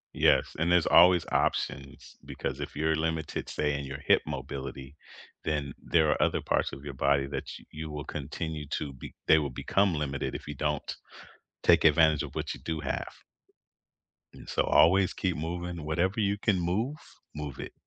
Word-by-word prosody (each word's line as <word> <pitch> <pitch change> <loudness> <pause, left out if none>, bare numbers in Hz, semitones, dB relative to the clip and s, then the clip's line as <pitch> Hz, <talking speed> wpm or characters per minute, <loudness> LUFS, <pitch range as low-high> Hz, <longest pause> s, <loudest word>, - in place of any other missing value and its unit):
Yes, - - +3
and 85 +2 +2
there's 90 -2 +4
always 90 0 +6
options, 70 0 -2
because 70 +1 -5
if 70 - -6
you're 80 +1 +1
limited, 80 -1 -2
say 75 -1 0
in 70 - -5
your 70 0 -6
hip 70 - +3
mobility, 70 +1 -6 0.5
then 75 -4 -2
there 80 -2 +3
are - - 0
other - - +2
parts - - 0
of 70 +1 -9
your 70 - -5
body 70 +1 +2
that 70 +1 -5
ch - - -8
you 80 0 -6
will 75 -1 -6
continue 75 +1 -5
to 75 -2 -3
be 65 - -10
they 80 - +6
will 70 -2 -2
become 95 +7 +1
limited 70 -2 -3
if - - -7
you 75 - -4
don't 75 +1 -2 0.7
take - - +5
advantage 80 -3 +5
of - - -7
what - - -3
you - - -10
do 80 -1 -3
have. 70 - -3 1.2
And - - -12
so - - +1
always 95 +3 +4
keep 90 -4 -1
moving, 85 +1 -4
whatever 90 +7 0
you 100 -1 +1
can 100 -3 +1
move, 110 - -1 0.4
move 75 -3 -6
it. - - -6
75 Hz, 180 wpm, -29 LUFS, 70-85 Hz, 1.2 s, always